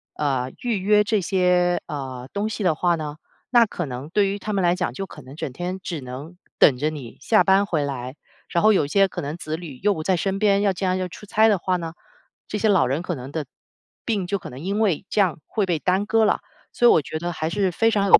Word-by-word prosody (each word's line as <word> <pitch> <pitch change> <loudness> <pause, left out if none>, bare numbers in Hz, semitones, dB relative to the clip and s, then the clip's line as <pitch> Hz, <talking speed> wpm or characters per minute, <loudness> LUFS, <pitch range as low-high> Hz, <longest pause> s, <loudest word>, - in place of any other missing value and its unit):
呃， 130 -3 -1
预 235 -5 0
约 210 +2 +4
这 210 0 +1
些， 180 -1 +2
呃， 130 -3 -6
东 205 +2 -1
西 215 -1 -4
的 180 - +3
话 175 +2 +1
呢， 150 -2 -5 0.3
那 240 -2 +6
可 175 - -4
能 130 +2 -6
对 200 +3 +2
于 200 +1 -3
他 215 - -4
们 195 -2 0
来 175 0 +4
讲， 180 - -2
就 195 - -4
可 - - -12
能 135 +2 -12
整 145 - -4
天 180 +5 -4
只 170 -5 -5
能 130 +7 -8 0.2
等 140 - +6
着 150 +3 +1
你 140 -7 -9
下 215 +8 +4
班 195 +1 +4
回 160 -6 0
来。 130 -1 -5 0.3
然 170 - +1
后 215 0 +6
有 150 -7 +2
些 195 +6 +4
可 - - -6
能 150 +4 -4
子 155 -2 -4
女 160 -6 -9
又 205 0 +4
不 160 - -5
在 185 +4 +1
身 195 +3 -1
边， 200 -1 +3
要 200 -2 +3
将 185 0 0
要 185 -1 -2
出 205 +4 -12
差 220 +2 +4
的 205 -4 +3
话 185 +2 0
呢， 165 -2 -5 0.5
这 - - -3
些 220 - +1
老 190 -11 +4
人 140 +6 -1
可 180 - -2
能 130 -2 -7
的 155 -1 -3 0.6
病 210 -5 0
就 200 +2 -1
可 - - -9
能 125 - -9
因 195 +7 -2
为 195 -6 +1
这 210 - +2
样 185 -6 +1
会 210 -4 -1
被 175 -3 +1
耽 185 +5 +1
搁 225 0 +4
了。 - - +2 0.3
所 240 - +4
以 - - +8
我 - - +5
觉 155 +3 -5
得 175 +2 -3
还 160 -1 -3
是 200 -1 +1
非 225 +6 +2
常 200 -2 +2
有 - - +8
180 Hz, 280 characters per minute, -23 LUFS, 155-200 Hz, 0.6 s, 以